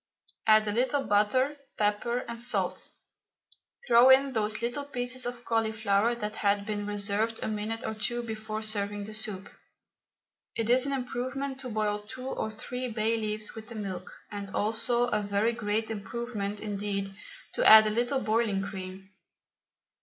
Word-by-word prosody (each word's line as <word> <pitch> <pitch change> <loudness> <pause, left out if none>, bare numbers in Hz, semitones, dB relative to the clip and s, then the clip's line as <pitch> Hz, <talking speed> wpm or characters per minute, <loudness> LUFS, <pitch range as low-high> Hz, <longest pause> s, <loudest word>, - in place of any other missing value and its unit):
Add 215 0 +6
a - - +1
little 255 +5 +1
butter, 255 +8 +2 0.2
pepper, 215 +4 0
and 235 0 -5
salt; 240 - -1 1.0
throw 240 +1 +7
in 265 +1 +6
those 215 0 -1
little 245 +5 -1
pieces 250 -2 -3
of 245 -1 -6
cauliflower 220 0 +1
that 210 -2 -4
had 200 0 +1
been 205 -1 -3
reserved 205 +2 -1
a - - -1
minute 220 +2 -3
or - - -2
two 240 +3 -2
before 220 -1 -4
serving 205 -1 -1
the 215 - -6
soup. 210 -3 -2 1.1
It 230 +1 0
is 255 +2 +4
an - - -1
improvement 265 +1 -3
to 255 - -5
boil 210 -2 0
two 255 +5 -9
or 220 - -2
three 250 +4 -4
bay 225 -1 0
leaves 215 -1 -3
with 220 -1 -9
the 235 - -8
milk, 190 -4 -5 0.2
and 200 -1 -5
also 225 +3 +1
a 210 -4 +1
very 205 +3 +1
great 220 -1 -1
improvement 210 -1 -4
indeed 200 -2 -2 0.4
to - - 0
add 220 0 +10
a 215 - +1
little 245 +4 +1
boiling 215 -2 +1
cream. 190 -1 -7
220 Hz, 160 wpm, -29 LUFS, 205-240 Hz, 1.1 s, add